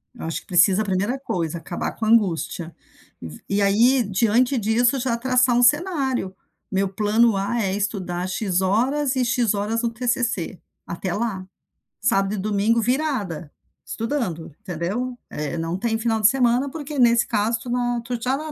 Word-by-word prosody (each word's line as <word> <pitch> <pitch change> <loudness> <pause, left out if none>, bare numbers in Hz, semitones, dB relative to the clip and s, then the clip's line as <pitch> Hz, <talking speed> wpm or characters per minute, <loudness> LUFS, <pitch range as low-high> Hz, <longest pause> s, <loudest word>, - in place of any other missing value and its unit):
eu 235 - -7
acho 165 - -3
que - - -27
precisa 185 +1 +4
a - - -2
primeira 200 +7 -1
coisa, 170 - -3
acabar 170 +1 -4
com 220 - -4
a - - +1
angústia. 170 -6 +1 0.5
Vo 80 -2 -9
e 200 +1 +1
aí, 235 +6 +4
diante 230 +6 +2
disso 240 +4 +2
já 245 -2 -1
traçar 255 0 +2
um 245 - +3
cenário, 265 - +1 0.4
meu 195 0 +1
plano 215 +3 +2
A, 200 +5 -1
é 190 -3 -1
estudar 185 -4 -2
X 190 -1 -1
horas 255 +9 +1
e 255 -1 +1
X 235 -2 +1
horas 210 +3 -1
no 235 - 0
TCC, 230 -6 -2 0.3
até 175 +1 -4
lá. 205 -3 -3 0.6
Sábado 195 +1 +1
e - - -5
domingo 210 +3 +1
virada, 225 - -2 0.3
estudando, 225 - -3
entendeu? 200 +9 -3
É, 150 +2 -4
não 165 +2 -2
tem 225 +2 -1
final 225 -1 0
de 210 - +7
semana, 250 +2 +2
porque 295 -1 -6
nesse 235 -1 +5
caso 225 +1 0
tu 245 - -8
não 245 -1 0
tu 235 0 -5
já 255 +3 0
na 310 +1 -6
225 Hz, 175 wpm, -22 LUFS, 190-245 Hz, 0.6 s, de